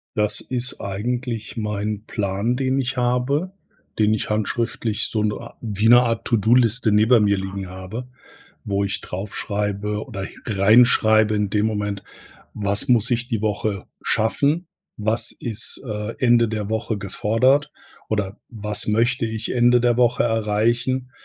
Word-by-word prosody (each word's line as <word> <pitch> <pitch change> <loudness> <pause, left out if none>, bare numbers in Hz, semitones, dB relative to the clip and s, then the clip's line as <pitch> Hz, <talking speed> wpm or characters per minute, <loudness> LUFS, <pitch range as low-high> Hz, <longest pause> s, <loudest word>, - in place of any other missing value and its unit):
Das 105 0 +1
ist 125 -1 -2
eigentlich 115 +3 -4
mein 105 -1 -3
Plan, 105 +3 -1
den 135 0 0
ich 130 0 -3
habe, 125 +8 0 0.5
den 105 0 +3
ich 110 - -1
handschriftlich 110 0 -1
so 110 - -1
'ne 105 -1 0
a - - -11
wie 105 -1 -2
'ne 120 +1 +8
Art 115 -2 -1
To-Do-Liste 115 0 +3
neben 110 +1 +5
mir 100 0 +3
liegen 95 0 -5
habe, 95 +7 -7 0.6
wo 100 -1 -1
ich 100 - -2
drauf 95 +3 -6
schreibe 105 +1 -2
oder 100 -6 -7
hi - - -9
reinschreibe 110 0 +4
in 105 -1 0
dem 105 +1 +1
Moment, 105 -2 -2 0.5
was 100 +6 +1
muss 120 -2 +3
ich 120 +1 0
die 115 -5 -1
Woche 105 -2 -2 0.2
schaffen? 145 +10 +1 0.3
Was 110 +2 -1
ist, 115 -1 -1
äh, 105 0 -4
Ende 120 -2 +4
der 105 -2 -3
Woche 110 -1 -2
gefordert, 125 +9 +1 0.4
oder 105 -1 -2
was 105 -2 -3
möchte 115 +3 +1
ich 110 0 -4
Ende 120 0 +4
der 120 -1 +2
Woche 125 0 +3
erreichen? 115 +3 0
110 Hz, 150 wpm, -22 LUFS, 105-120 Hz, 0.6 s, ne